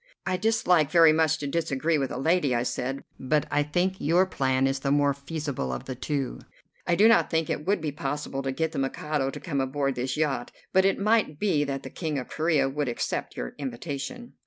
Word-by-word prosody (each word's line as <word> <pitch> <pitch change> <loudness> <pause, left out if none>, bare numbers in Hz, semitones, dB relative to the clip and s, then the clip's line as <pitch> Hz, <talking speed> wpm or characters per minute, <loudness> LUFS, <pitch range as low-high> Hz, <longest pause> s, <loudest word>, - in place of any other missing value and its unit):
"I 185 - 0
dislike 180 -7 +2
very 165 -1 +6
much 160 0 +2
to 145 - -5
disagree 155 0 0
with 135 -2 -1
a - - -5
lady," 145 -2 +2
I 120 - +1
said, 130 +2 -3 0.2
"but 150 +3 +1
I 145 - +3
think 175 +6 0
your 175 +5 +4
plan 130 -6 +1
is 135 0 0
the 135 - -2
more 145 0 +3
feasible 140 - -4
of 65 - -5
the 130 - -4
two. 135 +1 -3 0.5
I 175 - +3
do 210 +5 +6
not 230 - +4
think 160 -2 0
it 150 - -4
would 200 -3 +2
be 155 -2 -2
possible 140 -1 -3
to 135 -1 -2
get 160 +4 -1
the 160 - -3
Mikado 135 +1 -1
to - - -7
come 140 -6 -2
aboard 135 +1 -1
this 125 +1 -3
yacht, 145 -5 -1 0.2
but 190 0 +5
it 195 - +3
might 210 -6 +2
be 160 -6 +2
that 140 -1 -4
the - - -8
King 155 -4 -3
of 125 - -5
Corea 155 -4 +2
would 140 0 -2
accept 120 - -3
your - - -4
invitation." 145 - -5
145 Hz, 220 wpm, -27 LUFS, 135-165 Hz, 0.5 s, very